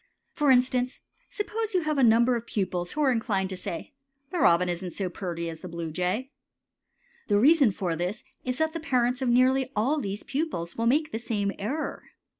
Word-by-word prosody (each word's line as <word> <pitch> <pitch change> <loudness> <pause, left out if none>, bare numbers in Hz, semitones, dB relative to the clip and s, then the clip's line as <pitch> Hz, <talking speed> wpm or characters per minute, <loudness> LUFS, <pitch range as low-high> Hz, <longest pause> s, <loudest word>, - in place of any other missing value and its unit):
For 295 -2 +1
instance, 250 0 +2 0.3
suppose 440 -1 -3
you 365 - +3
have 305 -3 0
a - - +4
number 235 +2 +5
of 235 0 -5
pupils 180 -3 -2
who 305 - 0
are 270 - +4
inclined 200 -5 0
to - - -3
say 180 - -6 0.4
"The 360 - -2
robin 175 - +4
isn't 175 0 -3
so 190 -3 -2
purty 170 -2 -4
as 165 -1 -6
the 185 - -8
bluejay." 180 - -3 1.0
The 205 - +3
reason 285 +1 +6
for 185 -4 -2
this 180 +6 -3 0.2
is 255 0 -2
that 315 +1 0
the 330 - -3
parents 255 -4 +1
of 260 - +1
nearly 260 +2 +3
all 265 +9 +1
these 200 -4 -4
pupils 275 - -3
will 230 0 0
make 300 +5 +2
the 225 - -3
same 205 -4 -1
error. 270 +10 -3
235 Hz, 195 wpm, -27 LUFS, 185-275 Hz, 1.0 s, reason